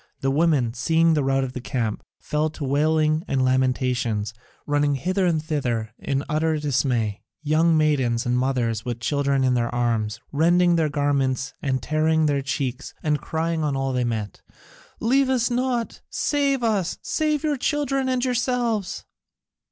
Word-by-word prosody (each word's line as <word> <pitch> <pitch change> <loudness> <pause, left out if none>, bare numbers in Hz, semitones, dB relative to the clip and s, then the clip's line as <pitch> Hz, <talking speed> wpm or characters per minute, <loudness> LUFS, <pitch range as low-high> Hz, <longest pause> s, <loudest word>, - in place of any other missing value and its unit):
The 135 - +1
women, 145 -6 +2
seeing 160 +7 +2
the 150 -2 +1
rout 135 0 +1
in 130 - -3
the 125 - -6
camp, 120 -5 -2 0.2
fell 150 +1 -1
to 155 -1 -8
wailing 155 +3 +2
and 130 -1 +1
lamentations, 125 -4 0 0.3
running 145 -1 +1
hither 185 +7 0
and 165 -2 +2
thither 125 -9 -2
in 140 0 -1
utter 155 +1 +1
dismay, 125 -7 0 0.2
young 160 +2 +3
maidens, 135 -6 +1
and 125 0 +1
mothers 125 -4 0
with 120 -1 -4
children 140 +1 +1
in 130 -1 +3
their 120 -1 +1
arms, 115 -3 -1
rending 175 +3 +3
their 160 -2 +2
garments 135 -3 0
and 130 -3 -1
tearing 155 +1 +2
their 145 -2 +1
cheeks 135 -2 -3
and 150 -2 0
crying 160 0 -2
on 145 -2 0
all 135 0 -1
they 125 -1 +1
met, 110 -4 -3 0.6
"Leave 265 +3 +2
us 250 -2 +1
not, 245 -1 -1
save 280 -3 0
us, 205 -6 0
save 305 -1 0
your 300 -2 +1
children 275 -1 0
and 255 0 0
yourselves!" 245 -5 -1
145 Hz, 160 wpm, -23 LUFS, 130-170 Hz, 0.6 s, young